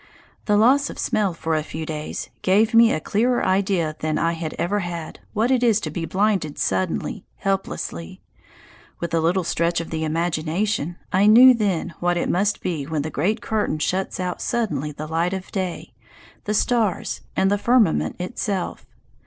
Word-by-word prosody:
The 210 Hz, -1 st, +3 dB
loss 265 Hz, +6 st, +4 dB
of -, -, -8 dB
smell 210 Hz, -3 st, 0 dB
for 165 Hz, -1 st, -3 dB
a 155 Hz, -, +1 dB
few 160 Hz, +1 st, -6 dB
days 155 Hz, -1 st, -5 dB
gave 215 Hz, +5 st, +3 dB
me 230 Hz, 0 st, +7 dB
a -, -, 0 dB
clearer 240 Hz, +9 st, +1 dB
idea 185 Hz, -5 st, +1 dB
than 155 Hz, 0 st, -1 dB
I 165 Hz, -, +1 dB
had 165 Hz, -2 st, -5 dB
ever 200 Hz, +4 st, 0 dB
had 170 Hz, -3 st, -5 dB
what 230 Hz, +4 st, +1 dB
it 255 Hz, -2 st, +3 dB
is 230 Hz, -4 st, +4 dB
to 155 Hz, -, -4 dB
be 165 Hz, +2 st, -3 dB
blinded 190 Hz, -4 st, 0 dB
suddenly, 95 Hz, 0 st, -1 dB
helplessly. 190 Hz, -, -3 dB, 0.8 s
With 170 Hz, -1 st, -4 dB
a 165 Hz, -, +3 dB
little 175 Hz, +3 st, +1 dB
stretch 170 Hz, 0 st, 0 dB
of 170 Hz, -, -6 dB
the 160 Hz, -1 st, -2 dB
imagination 170 Hz, +3 st, -1 dB, 0.2 s
I 195 Hz, +3 st, +4 dB
knew 250 Hz, +4 st, +9 dB
then 200 Hz, -8 st, -1 dB
what 175 Hz, 0 st, +1 dB
it -, -, -1 dB
must 200 Hz, +3 st, +1 dB
be 155 Hz, -6 st, -3 dB
when 155 Hz, -2 st, -2 dB
the 155 Hz, -, -4 dB
great 205 Hz, +11 st, 0 dB
curtain 215 Hz, -8 st, -1 dB
shuts 185 Hz, +6 st, -2 dB
out 180 Hz, -1 st, -3 dB
suddenly 215 Hz, -, -1 dB
the 150 Hz, +1 st, -7 dB
light 165 Hz, +3 st, -1 dB
of 190 Hz, -1 st, -6 dB
day, 185 Hz, -3 st, -4 dB, 0.5 s
the 210 Hz, -, 0 dB
stars, 225 Hz, -5 st, 0 dB
and 190 Hz, +1 st, +2 dB
the 205 Hz, -, +1 dB
firmament 235 Hz, -7 st, +2 dB
itself. 190 Hz, 0 st, -3 dB
180 Hz, 180 wpm, -22 LUFS, 160-210 Hz, 0.8 s, knew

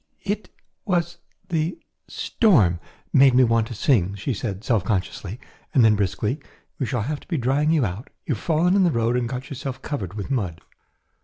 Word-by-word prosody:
"It 205 Hz, -1 st, -3 dB, 0.3 s
was 175 Hz, -4 st, -1 dB, 0.3 s
the 165 Hz, +1 st, -1 dB, 0.3 s
storm 110 Hz, -, +3 dB, 0.3 s
made 135 Hz, -2 st, +6 dB
me 130 Hz, -, +7 dB
want 115 Hz, -2 st, +2 dB
to 120 Hz, -, -7 dB
sing," 100 Hz, -, +2 dB
she 105 Hz, +7 st, -2 dB
said 100 Hz, -2 st, -4 dB
self 115 Hz, -5 st, +1 dB
consciously, 95 Hz, +2 st, -2 dB, 0.4 s
and 125 Hz, -4 st, +6 dB
then 110 Hz, -1 st, +5 dB
briskly, 105 Hz, -, -1 dB, 0.4 s
"we 130 Hz, -, -1 dB
shall 120 Hz, -4 st, -1 dB
have 145 Hz, +4 st, -3 dB
to -, -, -19 dB
be 170 Hz, -, -1 dB
drying 135 Hz, +4 st, +1 dB
you 155 Hz, -6 st, +3 dB
out; 100 Hz, +6 st, -5 dB, 0.2 s
you 145 Hz, -, 0 dB
have 110 Hz, -, -6 dB
fallen 170 Hz, +3 st, +3 dB
in 200 Hz, -, +5 dB
the 175 Hz, -, +4 dB
road 115 Hz, -4 st, +1 dB
and 120 Hz, -1 st, 0 dB
got 130 Hz, +2 st, -5 dB
yourself 135 Hz, -1 st, -5 dB
covered 100 Hz, -, -4 dB
with 105 Hz, +5 st, -5 dB
mud." 95 Hz, -11 st, -2 dB
125 Hz, 190 wpm, -23 LUFS, 105-155 Hz, 0.4 s, me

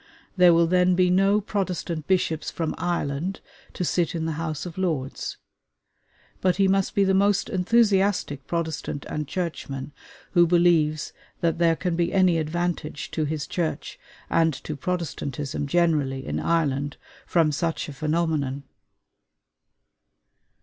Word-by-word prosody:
There 180 Hz, -2 st, +7 dB
will 170 Hz, 0 st, +5 dB
then 180 Hz, +1 st, +3 dB
be 180 Hz, 0 st, +3 dB
no 195 Hz, +3 st, +4 dB
Protestant 185 Hz, -6 st, -3 dB
bishops 170 Hz, -4 st, +1 dB
from 165 Hz, -2 st, -3 dB
Ireland 175 Hz, +1 st, -2 dB, 0.3 s
to 180 Hz, -, -2 dB
sit 170 Hz, 0 st, 0 dB
in 160 Hz, -1 st, -2 dB
the 165 Hz, -, -1 dB
House 155 Hz, -1 st, -4 dB
of 175 Hz, 0 st, -7 dB
Lords; 155 Hz, -8 st, -2 dB, 1.0 s
but 185 Hz, -1 st, +3 dB
he 195 Hz, -1 st, +3 dB
must 195 Hz, 0 st, +1 dB
be 200 Hz, -, +4 dB
the 190 Hz, 0 st, +2 dB
most 200 Hz, +1 st, +2 dB
enthusiastic 195 Hz, -, +2 dB
Protestant 160 Hz, -4 st, -3 dB
and 150 Hz, -1 st, -4 dB
Churchman 150 Hz, -6 st, -4 dB, 0.4 s
who 175 Hz, -2 st, +5 dB
believes 165 Hz, -3 st, +2 dB, 0.3 s
that 165 Hz, -1 st, +1 dB
there 165 Hz, -1 st, +4 dB
can 180 Hz, 0 st, -2 dB
be 170 Hz, 0 st, 0 dB
any 185 Hz, -3 st, +4 dB
advantage 160 Hz, -2 st, -3 dB
to 155 Hz, -, -1 dB
his 150 Hz, -1 st, -3 dB
Church 170 Hz, -3 st, -3 dB, 0.3 s
and 160 Hz, -3 st, +2 dB
to 155 Hz, -, -4 dB
Protestantism 145 Hz, -4 st, -3 dB
generally 145 Hz, -5 st, +1 dB
in -, -, -2 dB
Ireland 145 Hz, -4 st, 0 dB, 0.3 s
from 165 Hz, -3 st, +3 dB
such 165 Hz, +3 st, -2 dB
a 150 Hz, -, -7 dB
phenomenon. 155 Hz, -3 st, -1 dB
170 Hz, 135 wpm, -25 LUFS, 150-180 Hz, 1.0 s, There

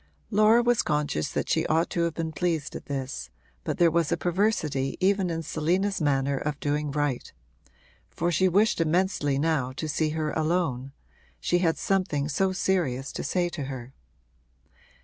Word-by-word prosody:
Laura 215 Hz, +3 st, +5 dB
was 240 Hz, -1 st, +3 dB
conscious 150 Hz, -, -1 dB
that -, -, -2 dB
she -, -, +2 dB
ought 160 Hz, +2 st, +2 dB
to 170 Hz, -, 0 dB
have 170 Hz, -, -3 dB
been 165 Hz, -1 st, -3 dB
pleased 160 Hz, -2 st, -2 dB
at -, -, -8 dB
this, 130 Hz, -, -4 dB, 0.3 s
but -, -, -2 dB
there 170 Hz, -1 st, +5 dB
was 170 Hz, -1 st, +1 dB
a 170 Hz, -, +2 dB
perversity 165 Hz, -7 st, 0 dB
even 195 Hz, -1 st, +2 dB
in 165 Hz, -1 st, -3 dB
Selina's 180 Hz, +6 st, 0 dB
manner 140 Hz, -2 st, +1 dB
of 145 Hz, +1 st, -3 dB
doing 150 Hz, +1 st, -1 dB
right; 145 Hz, -3 st, -2 dB, 0.8 s
for 175 Hz, +1 st, -1 dB
she 185 Hz, +3 st, +3 dB
wished 200 Hz, 0 st, +3 dB
immensely 165 Hz, -4 st, +1 dB
now 145 Hz, -4 st, 0 dB
to 155 Hz, +4 st, -4 dB
see 155 Hz, +1 st, 0 dB
her 155 Hz, -1 st, -1 dB
alone 155 Hz, -5 st, -1 dB, 0.5 s
she 175 Hz, -, +1 dB
had 165 Hz, -2 st, +1 dB
something 180 Hz, -7 st, 0 dB
so 190 Hz, +6 st, +1 dB
serious 165 Hz, -9 st, 0 dB
to -, -, -5 dB
say 180 Hz, -1 st, 0 dB
to 155 Hz, -5 st, -5 dB
her. 130 Hz, -1 st, -7 dB
160 Hz, 170 wpm, -27 LUFS, 140-180 Hz, 0.8 s, Laura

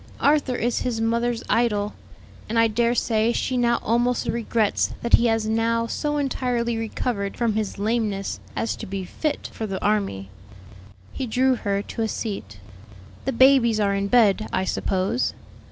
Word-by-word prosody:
Arthur 285 Hz, -3 st, +2 dB
is 240 Hz, 0 st, 0 dB
his 240 Hz, -3 st, -2 dB
mother's 235 Hz, +1 st, 0 dB
idol, 210 Hz, -3 st, +1 dB, 0.6 s
and 230 Hz, -, -1 dB
I 230 Hz, 0 st, +5 dB
dare 235 Hz, +2 st, +1 dB
say 225 Hz, -1 st, +2 dB
she 255 Hz, -, -1 dB
now 240 Hz, -1 st, +2 dB
almost 240 Hz, +2 st, +1 dB
regrets 225 Hz, -2 st, 0 dB
that 235 Hz, -, -3 dB
he 235 Hz, -, +6 dB
has 225 Hz, -1 st, +1 dB
now 230 Hz, +1 st, +1 dB
so 295 Hz, +5 st, -2 dB
entirely 250 Hz, -4 st, -1 dB
recovered 225 Hz, -2 st, -3 dB
from 235 Hz, -2 st, +1 dB
his 215 Hz, -1 st, -2 dB
lameness 210 Hz, -2 st, -1 dB, 0.2 s
as 230 Hz, -, -1 dB
to -, -, -7 dB
be 190 Hz, 0 st, -4 dB
fit 300 Hz, -, -3 dB
for 220 Hz, -, -4 dB
the 190 Hz, -2 st, -3 dB
army." 195 Hz, -, 0 dB, 0.8 s
He 260 Hz, -, -4 dB
drew 255 Hz, +3 st, +2 dB
her 200 Hz, -4 st, -1 dB
to 230 Hz, -, -6 dB
a 220 Hz, -, +1 dB
seat. 195 Hz, -, -5 dB, 0.7 s
"The 270 Hz, -, 0 dB
babies 235 Hz, -3 st, +5 dB
are 200 Hz, -1 st, +2 dB
in 200 Hz, 0 st, -1 dB
bed, 215 Hz, -2 st, +4 dB
I 185 Hz, -, 0 dB
suppose?" 190 Hz, +6 st, -1 dB
230 Hz, 165 wpm, -23 LUFS, 205-240 Hz, 0.8 s, he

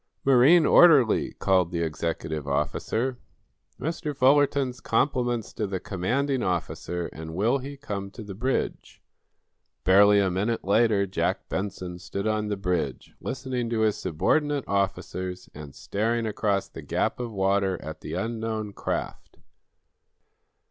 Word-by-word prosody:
"Marine 140 Hz, +6 st, +6 dB
orderly!" 150 Hz, -12 st, +5 dB
called 95 Hz, -3 st, +2 dB
the 85 Hz, -1 st, -2 dB
executive 80 Hz, -1 st, -3 dB
officer. 110 Hz, -, -1 dB, 0.6 s
"Mr. 150 Hz, -2 st, -3 dB
Fullerton's 135 Hz, -1 st, +3 dB
compliments 120 Hz, -5 st, 0 dB
to 105 Hz, -, -2 dB
the 95 Hz, -1 st, -3 dB
commanding 125 Hz, +10 st, -1 dB
officer, 90 Hz, -, -2 dB
and 80 Hz, 0 st, -7 dB
will 115 Hz, +9 st, +2 dB
he 140 Hz, +2 st, -8 dB
come 100 Hz, -8 st, -5 dB
to 110 Hz, +3 st, -10 dB
the 100 Hz, -2 st, -8 dB
bridge?" 125 Hz, +7 st, -2 dB, 0.8 s
Barely 100 Hz, +3 st, +6 dB
a 95 Hz, -2 st, +2 dB
minute 105 Hz, +6 st, -1 dB
later, 100 Hz, 0 st, +3 dB
Jack 95 Hz, 0 st, -2 dB
Benson 90 Hz, -2 st, -4 dB
stood 100 Hz, +3 st, -5 dB
on 110 Hz, -1 st, 0 dB
the 105 Hz, -1 st, -2 dB
bridge, 90 Hz, -8 st, -2 dB
listening 125 Hz, -2 st, -3 dB
to 115 Hz, -2 st, 0 dB
his 110 Hz, -2 st, +2 dB
subordinate 145 Hz, -, 0 dB
officers 95 Hz, -2 st, -2 dB
and 75 Hz, -1 st, -10 dB
staring 110 Hz, +10 st, -1 dB
across 105 Hz, -2 st, 0 dB
the -, -, -10 dB
gap -, -, -1 dB
of 120 Hz, -2 st, -4 dB
water 95 Hz, -1 st, +1 dB
at 80 Hz, +1 st, -8 dB
the 80 Hz, -, -5 dB
unknown 110 Hz, 0 st, -3 dB
craft. -, -, -4 dB
105 Hz, 135 wpm, -26 LUFS, 90-125 Hz, 0.8 s, Marine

